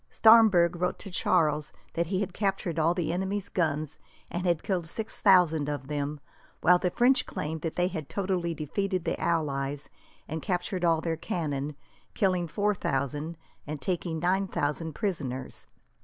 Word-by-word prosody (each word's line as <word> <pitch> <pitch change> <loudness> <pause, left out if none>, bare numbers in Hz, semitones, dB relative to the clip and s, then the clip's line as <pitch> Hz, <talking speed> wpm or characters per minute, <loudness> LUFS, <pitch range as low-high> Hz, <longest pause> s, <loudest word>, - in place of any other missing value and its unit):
Staremberg 215 -7 +6
wrote 180 +1 -1
to 195 - -8
Charles 155 -5 +1 0.2
that 170 0 0
he 185 +2 0
had 200 -3 -3
captured 190 -5 -1
all 165 +2 +3
the 170 -2 -1
enemy's 190 +2 -2
guns, 155 -3 -1 0.3
and 180 +1 -2
had 170 -3 +1
killed 180 -4 -1
six 220 +6 -4
thousand 170 -7 +5
of 145 -2 -4
them; 145 0 -2 0.4
while 180 +1 +6
the 180 - +1
French 245 +6 +3
claimed 160 +1 -4
that 165 0 -3
they 180 0 +2
had 160 -7 -5
totally 185 -4 -1
defeated 185 +4 -2
the - - -1
allies, 145 -3 -1 0.4
and 160 +1 -4
captured 180 +3 -2
all 165 -2 +3
their 165 -1 -2
cannon, 150 -3 -3 0.4
killed 180 -4 +1
four 205 +7 +1
thousand, 145 0 -2 0.3
and 150 0 -4
taken 170 +1 -2
nine 185 +4 +1
thousand 160 -1 -2
prisoners. 140 -9 -4
170 Hz, 160 wpm, -28 LUFS, 150-185 Hz, 0.4 s, Staremberg